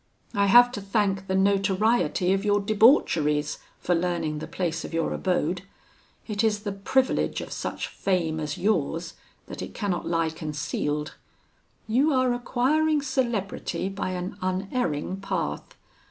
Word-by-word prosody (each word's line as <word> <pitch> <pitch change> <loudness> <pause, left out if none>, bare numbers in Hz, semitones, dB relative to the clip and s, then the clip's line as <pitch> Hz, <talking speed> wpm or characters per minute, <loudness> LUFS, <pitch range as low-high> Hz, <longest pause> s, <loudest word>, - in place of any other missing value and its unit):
I 200 0 +2
have 245 +4 +7
to 220 -5 -5
thank 195 -1 0
the 190 - 0
notoriety 195 0 +2
of 195 +1 0
your 205 -1 +3
debaucheries 200 - +3 0.2
for 180 - 0
learning 165 -3 -1
the - - -6
place 165 -3 -2
of - - -6
your 165 - 0
abode. 180 -1 0 0.7
It 210 -1 -1
is 210 -2 +1
the 205 - -3
privilege 255 +7 +1
of - - -7
such - - -3
fame 170 -5 -1
as 150 -1 -3
yours, 170 -4 0 0.3
that - - -8
it - - -7
cannot 195 -4 -2
lie 165 -1 +1
concealed. 150 0 -3 0.7
You 270 +7 +3
are 255 -1 +3
acquiring 290 +5 +1
celebrity 235 -8 -2
by 195 -1 -3
an 185 +3 -5
unerring 185 - -1
path. 75 - -3
195 Hz, 140 wpm, -26 LUFS, 165-220 Hz, 0.7 s, have